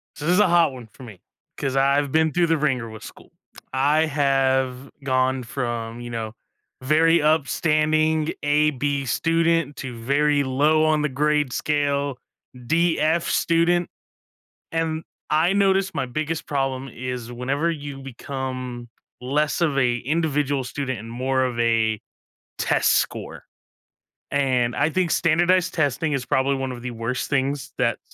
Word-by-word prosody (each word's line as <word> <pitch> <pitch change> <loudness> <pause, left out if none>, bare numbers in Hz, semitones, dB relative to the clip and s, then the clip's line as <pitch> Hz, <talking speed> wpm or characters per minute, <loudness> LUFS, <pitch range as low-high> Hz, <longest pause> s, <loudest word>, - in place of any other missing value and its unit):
So 150 - -7
this 175 - +3
is 195 - +3
a 210 - +5
hot 170 -5 +3
one 120 -3 -10
for 130 - -14
me 105 -6 -11 0.4
'cause 135 -1 -2
I've 140 +1 +2
been 160 -1 +3
through 175 +1 +2
the 165 -1 +2
ringer 130 -6 -1
with 110 -1 -10
school. - - -13 0.4
I 145 +4 +3
have 135 -3 +1
gone 130 -1 +1
from, 120 -2 -4
you 120 - -7
know, 110 -2 -4 0.5
very 160 +4 +4
upstanding 155 +1 +2
A-B 145 -1 +1
student 165 +2 +1
to 130 -3 -6
very 145 +4 +2
low 150 +4 +2
on 155 -1 +2
the 150 - 0
grade 150 0 +1
scale 145 -2 0 0.5
D-F 165 +1 +2
student, 170 +1 +2 0.8
and 165 -1 -1 0.3
I 160 +5 +3
noticed 195 -1 +2
my - - -1
biggest 155 +5 -3
problem 135 -1 -2
is 125 -1 -6
whenever 135 +7 -1
you 145 -3 -6
become 130 -2 -6 0.3
less 145 +6 0
of 150 -5 +1
a 125 -3 +2
individual 145 -1 0
student 130 -1 -4
and 115 +2 -9
more 130 +2 0
of 125 -2 -3
a 110 -2 +2 0.6
test - - +2
score, - - -2 0.9
and 130 -4 +1
I 145 +2 +2
think 180 +1 0
standardized 175 +3 +2
testing 150 0 0
is 135 -3 -2
probably 135 +1 +1
one 135 -1 -3
of 120 -1 -7
the 125 - -5
worst 115 +2 -3
things 140 0 -1
that - - +1
140 Hz, 145 wpm, -23 LUFS, 130-155 Hz, 0.9 s, a